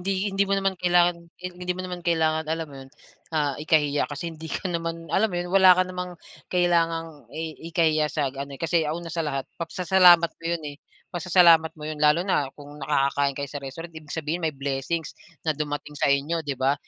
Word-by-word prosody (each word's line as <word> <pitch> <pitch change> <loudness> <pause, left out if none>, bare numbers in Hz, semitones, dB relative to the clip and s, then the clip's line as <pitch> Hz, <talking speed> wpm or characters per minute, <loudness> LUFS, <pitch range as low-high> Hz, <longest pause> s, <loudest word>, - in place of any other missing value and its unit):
hindi 195 +2 -1
hindi 195 0 +1
mo 200 - +2
naman 195 0 +1
kailangan 175 0 +4 0.2
hindi 180 0 -4
mo 185 - -4
naman 180 -1 -5
kailangan 160 -2 +1
alam 160 0 -2
mo - - -11
'yun, 135 - -12 0.5
ah, 145 -2 +1
ikahiya 150 -2 +2
kasi 165 +3 -5
hindi 160 0 -9
ka 185 +4 -3
naman 165 0 -4
alam 220 +3 +3
mo 180 - -4
'yun, 175 0 -3
wala 190 -2 +7
ka 185 - +4
namang 180 -1 -6 0.3
kailangang 165 -5 0
i 160 +4 -5 0.2
ikahiya 155 -2 +2
sa 140 -4 -1
ano, 140 0 -6
eh, - - -25
kasi 165 0 +2
una 165 +2 -4
sa 170 - -2
lahat 135 -2 -2 0.2
pagsasalamat 175 0 +5
mo 165 - -15
yun, 170 -2 -1
eh, - - -19 0.4
pasasalamat 170 -2 +5
mo 150 - -9
'yun 155 -1 -5
lalo 150 +4 +4
na 145 -8 +1
kung 145 0 -12
nakakakain 140 -1 +1
kayo 140 -1 -4
sa 145 - -5
restaurant, 165 +5 -8
ibig 155 -2 -11
sabihin 160 +2 -2
may 160 -3 -1
blessings 140 +4 -3 0.3
na 155 - +2
dumating 145 0 -4
sa 145 -1 0
inyo, 145 +4 +1
'di 145 -4 -4
ba? 135 +2 +2
165 Hz, 205 wpm, -25 LUFS, 145-175 Hz, 0.5 s, wala